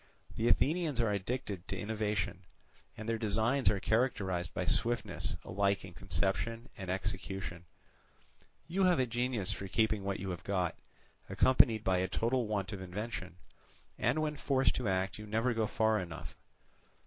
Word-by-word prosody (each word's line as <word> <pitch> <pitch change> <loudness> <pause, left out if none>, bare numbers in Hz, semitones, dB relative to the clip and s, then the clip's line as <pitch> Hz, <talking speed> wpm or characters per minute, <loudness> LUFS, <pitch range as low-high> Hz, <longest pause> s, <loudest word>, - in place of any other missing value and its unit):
The 115 - +1
Athenians 155 0 +2
are 115 -3 +3
addicted 100 -2 -3
to 95 - -3
innovation, 105 -3 -1 0.6
and 110 - -6
their 115 -1 0
designs 115 +5 +2
are 100 - +1
characterized 95 -6 0
by - - -2
swiftness 110 -5 0
alike 100 0 +1
in 90 - -10
conception 95 +7 -1
and 95 -2 -6
execution; 95 -2 -3 1.0
you 185 +3 +2
have 180 -2 +5
a 130 - +3
genius 120 -4 0
for 100 - -4
keeping 110 0 +1
what 100 0 -2
you 95 0 -3
have 90 - -6
got, 90 -4 0 0.5
accompanied 115 +2 +5
by 95 -1 +2
a 95 - +1
total 120 +2 0
want 105 -1 -2
of 100 - -5
invention, 95 0 -5 0.6
and 125 +6 +2
when 150 -1 -2
forced 135 -1 +2
to 125 - -1
act 95 0 0
you 105 - -8
never 115 +4 +1
go 110 -1 +1
far 110 0 +2
enough. 80 -4 -7
105 Hz, 160 wpm, -33 LUFS, 95-120 Hz, 1.0 s, have